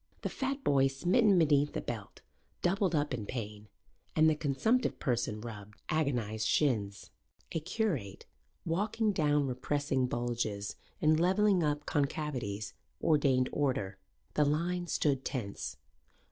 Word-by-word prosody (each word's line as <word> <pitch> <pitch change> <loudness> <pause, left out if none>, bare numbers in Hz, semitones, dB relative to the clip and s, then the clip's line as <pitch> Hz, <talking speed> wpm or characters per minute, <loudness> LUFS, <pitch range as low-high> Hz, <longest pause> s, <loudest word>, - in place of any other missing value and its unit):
The - - -1
fat 270 +1 -3
boy, 135 -1 +4
smitten 180 - +3
beneath 150 -3 +3
the - - -1
belt, 110 -5 -6 0.4
doubled 180 -1 +2
up 145 -2 0
in 110 -5 -4
pain 105 -3 -5 0.5
and 155 0 +5
the 155 - +5
consumptive 155 - +1
person 120 -5 -1
rubbed 105 -3 -9
agonized 120 -8 0
shins. 105 -9 0 0.4
A 165 - -1
curate, 160 - -2 0.4
walking 210 +6 +1
down 150 -5 +2
repressing 135 +1 0
bulges 120 -4 -2 0.3
and 155 +1 +5
levelling 190 +2 +3
up 145 -1 0
concavities, 125 -9 -2 0.3
ordained 140 -5 +3
order. 105 -9 -1 0.3
The 150 - +3
line 175 +4 0
stood 140 -5 +1
tense. 105 -7 -4
145 Hz, 125 wpm, -32 LUFS, 120-165 Hz, 0.5 s, and